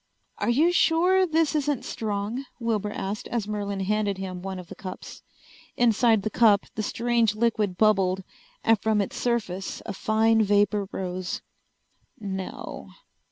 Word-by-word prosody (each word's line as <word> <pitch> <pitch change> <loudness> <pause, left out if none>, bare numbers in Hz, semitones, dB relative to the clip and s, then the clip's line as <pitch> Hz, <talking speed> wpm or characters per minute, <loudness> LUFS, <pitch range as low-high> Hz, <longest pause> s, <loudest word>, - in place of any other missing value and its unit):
"Are - - 0
you 300 +9 +4
sure 360 +2 +4
this 320 -1 +2
isn't 295 -3 0
strong?" 215 +4 -3 0.2
Wilbur 220 -3 -1
asked 205 +2 -4
as 230 -4 -2
Merlin 200 -2 -3
handed 205 0 0
him 185 -2 -5
one 190 0 -5
of 180 - -8
the - - -9
cups. 185 -1 -9 0.6
Inside 230 -2 +3
the 215 - -2
cup 210 -4 +4
the 215 - -3
strange 230 0 +1
liquid 215 -4 0
bubbled, 190 -3 +3 0.4
and 225 -3 +3
from 220 -1 +2
its 200 - -2
surface 210 -6 -2
a 200 - -4
fine 220 +2 +2
vapor 205 -1 +2
rose. 185 -1 -4 0.8
"No." 190 -3 -6
210 Hz, 145 wpm, -26 LUFS, 195-235 Hz, 0.8 s, you